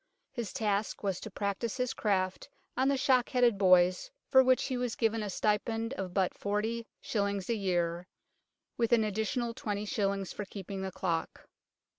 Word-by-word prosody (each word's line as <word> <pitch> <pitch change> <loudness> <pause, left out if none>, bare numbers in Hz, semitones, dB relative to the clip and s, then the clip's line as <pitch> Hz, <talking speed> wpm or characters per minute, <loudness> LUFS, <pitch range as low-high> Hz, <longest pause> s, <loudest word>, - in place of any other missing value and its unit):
His 235 -6 -4
task 215 -5 -1
was 195 -3 -1
to 220 - -7
practise 200 +3 -2
his 250 -1 -1
craft 190 -3 -1 0.3
on 260 +2 +2
the 275 0 +2
shock 260 -2 +3
headed 245 -6 +3
boys, 185 - +4 0.2
for 265 - +8
which 255 0 +3
he 260 - -2
was 245 -2 -2
given 225 -1 +1
a 210 - -3
stipend 225 +4 0
of 190 -8 -4
but 185 0 +1
405. 205 -2 -2
a - - +3
year, 175 -4 -1 0.7
with 235 0 +2
an 225 -2 +5
additional 220 +3 -1
2os. 205 -5 -2
for 205 - -5
keeping 195 0 -6
the 190 0 -3
clock. 170 -3 -3
210 Hz, 160 wpm, -31 LUFS, 195-235 Hz, 0.7 s, for